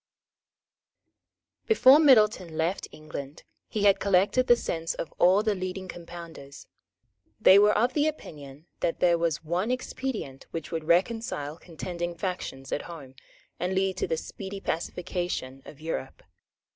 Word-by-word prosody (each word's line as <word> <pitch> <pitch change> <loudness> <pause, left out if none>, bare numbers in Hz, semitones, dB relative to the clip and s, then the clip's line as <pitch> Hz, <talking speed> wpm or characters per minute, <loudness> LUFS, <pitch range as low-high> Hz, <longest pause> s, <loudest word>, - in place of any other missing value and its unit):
Before 295 - +7
Middleton 215 - +4
left 170 +4 -1
England 150 -2 -8 0.2
he 210 - -2
had 200 -1 +5
collected 200 +7 +2
the 240 - +7
sense 165 -7 -3
of 165 - -6
all 190 +4 +5
the 215 -1 +2
leading 185 0 -5
Compounders. 170 -5 -10 0.7
They 195 - +8
were 210 +1 +5
of 245 +4 +1
opinion 155 - -3
that 165 - -1
there 175 -1 +3
was 165 -2 -1
one 175 +7 -1
expedient 255 - -4
which 165 -2 -6
would 160 -2 -3
reconcile 175 - 0
contending 175 +1 -6
factions 170 -8 -5
at - - -1
home, 145 -6 -10 0.5
and 180 +2 -1
lead 190 0 +1
to - - -1
the 160 - -1
speedy 195 +4 -7
pacification 175 -7 -3
of 145 - -12
Europe. 155 -4 -5
175 Hz, 135 wpm, -27 LUFS, 160-205 Hz, 0.7 s, They